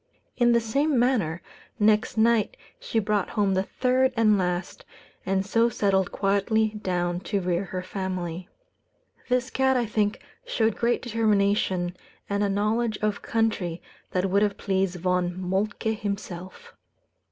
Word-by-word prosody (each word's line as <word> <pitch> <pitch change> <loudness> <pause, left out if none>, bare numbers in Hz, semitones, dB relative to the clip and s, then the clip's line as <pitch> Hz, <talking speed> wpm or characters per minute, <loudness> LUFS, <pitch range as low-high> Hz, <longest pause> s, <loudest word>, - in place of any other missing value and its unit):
In 240 -1 +4
the 235 - +5
same 275 +6 +1
manner, 225 -10 +1 0.4
next 215 +1 +2
night 225 -1 +3 0.2
she - - -3
brought 210 -2 +1
home 205 -3 +1
the 190 - +2
third 255 +5 +1
and 215 -2 +5
last, 180 -1 -2 0.4
and 190 0 +1
so 230 +4 +3
settled 195 -4 +1
quietly 205 +2 +1
down 180 -4 -2
to 200 +2 -2
rear 180 +1 -1
her 185 0 -5
family. 185 -2 -4 0.8
This 250 0 +1
cat, 265 0 +2
I 240 - +1
think, 210 -1 0 0.2
showed 220 -2 0
great 235 +1 0
determination, 200 -6 +1 0.3
and 200 0 0
a 200 - +1
knowledge 215 +3 0
of 210 -1 0
country 210 -7 -1 0.3
that 185 +1 0
would 200 +1 +3
have 205 -1 +1
pleased 190 -2 0
Von 180 0 0
Moltke 200 +4 -1
himself. 195 -4 -6
205 Hz, 140 wpm, -26 LUFS, 185-225 Hz, 0.8 s, the